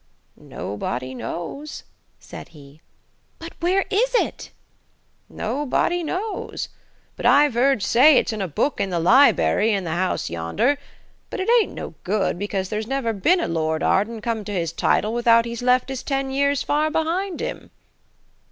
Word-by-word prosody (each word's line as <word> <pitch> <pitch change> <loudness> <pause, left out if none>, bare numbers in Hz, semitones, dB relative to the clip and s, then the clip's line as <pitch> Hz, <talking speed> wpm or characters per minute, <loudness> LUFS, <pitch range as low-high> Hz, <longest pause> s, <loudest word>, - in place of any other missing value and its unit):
"Nobody 125 +5 -5
knows," 175 - -6 0.4
said - - -10
he. 145 0 -16 0.6
"But 330 0 -9
where 370 +3 +1
is - - +1
it?" - - -1 0.8
"Nobody 290 +8 -1
knows. 375 +6 -4 0.5
But - - -1
I've 285 -3 +5
'eard 255 -3 +2
say 265 +7 +6
it's - - +1
in 215 - -4
a 190 - -1
book 225 - -1
in 195 - -1
the 175 - -1
libery 225 +1 +4
in 200 -2 0
the 165 - -4
house 180 +3 -1
yonder. 85 - 0 0.5
But - - -5
it 375 - -2
ain't - - -5
no - - -7
good, 195 -2 -1
because 195 -2 -3
there's 215 0 -3
never 265 -3 -1
been 330 - +2
a - - -1
Lord 160 -1 -1
Arden 220 +3 +1
come 225 -1 -2
to 210 - -5
his 170 -4 -2
title 215 +5 +1
without 235 -1 +4
he's 235 0 -5
left 250 +1 +2
his 265 -2 -4
ten 270 -1 -2
years 280 0 +1
far 305 +1 +1
behind 335 +4 -1
him." - - -5
235 Hz, 160 wpm, -22 LUFS, 190-290 Hz, 0.8 s, say